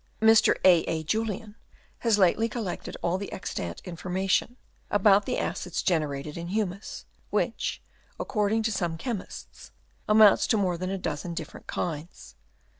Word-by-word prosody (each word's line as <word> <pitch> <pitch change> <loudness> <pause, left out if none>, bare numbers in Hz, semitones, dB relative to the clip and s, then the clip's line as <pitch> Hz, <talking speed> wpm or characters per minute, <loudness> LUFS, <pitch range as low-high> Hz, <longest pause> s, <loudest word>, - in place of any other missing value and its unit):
Mr. 220 0 +6
A. 180 -2 +8
A. 160 -1 -2
Julien 215 +4 -2 0.4
has 230 -3 +2
lately 210 +4 +3
collected 215 -7 -5
all 175 +2 +1
the 200 - -6
extant 85 - -5
information 185 +6 -1 0.3
about 205 -1 +4
the - - 0
acids 180 -1 -3
gen 170 -4 +3
erated 145 +1 -5
in 170 0 -5
humus, 200 0 -3 0.2
which, - - -1 0.4
according 215 0 0
to 220 - 0
some 175 -4 -2
chemists, 215 +2 -7 0.4
amount 215 -1 +7
to 220 - +2
more 185 -3 +1
than 185 +2 -4
a 195 - -2
dozen 170 -1 -4
different 160 -3 -8
kinds. 165 0 -5
190 Hz, 145 wpm, -27 LUFS, 170-215 Hz, 0.4 s, A